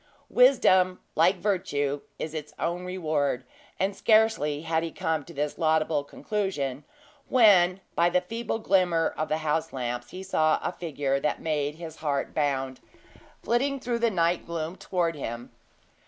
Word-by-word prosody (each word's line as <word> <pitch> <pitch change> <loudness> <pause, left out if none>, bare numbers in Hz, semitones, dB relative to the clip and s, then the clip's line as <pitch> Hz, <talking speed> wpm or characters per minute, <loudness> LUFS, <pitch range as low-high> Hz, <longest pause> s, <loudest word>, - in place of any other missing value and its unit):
Wisdom, 185 -8 +5
like 170 +5 +4
Virtue, 145 -8 -1 0.2
is 155 - -5
its 150 -1 -6
own 175 +2 -2
reward; 155 -8 -1 0.4
and 195 +1 0
scarcely 215 -10 +2
had 160 0 0
he 165 - -3
come 160 -2 -1
to 170 - -13
this 150 -1 -3
laudable 155 -2 +2
conclusion, 145 -6 -3 0.5
when, 195 -6 +5
by 170 +1 +3
the 180 +1 +3
feeble 225 +4 -3
glimmer 185 -6 +2
of 155 - -2
the 155 - +1
house 160 +2 0
lamps, 120 -1 -4
he 185 +1 -8
saw 155 -4 +2
a - - -1
figure 145 -6 -2
that 150 - -1
made 150 -2 -1
his 160 -1 -9
heart 145 -3 -2
bound, 135 -3 -1 0.6
flitting 275 +4 +1
through 240 -2 -2
the 235 0 +3
night 170 -3 +1
gloom 165 0 -4
toward 180 -3 -1
him. 120 -5 -6
165 Hz, 155 wpm, -27 LUFS, 150-185 Hz, 0.6 s, Wisdom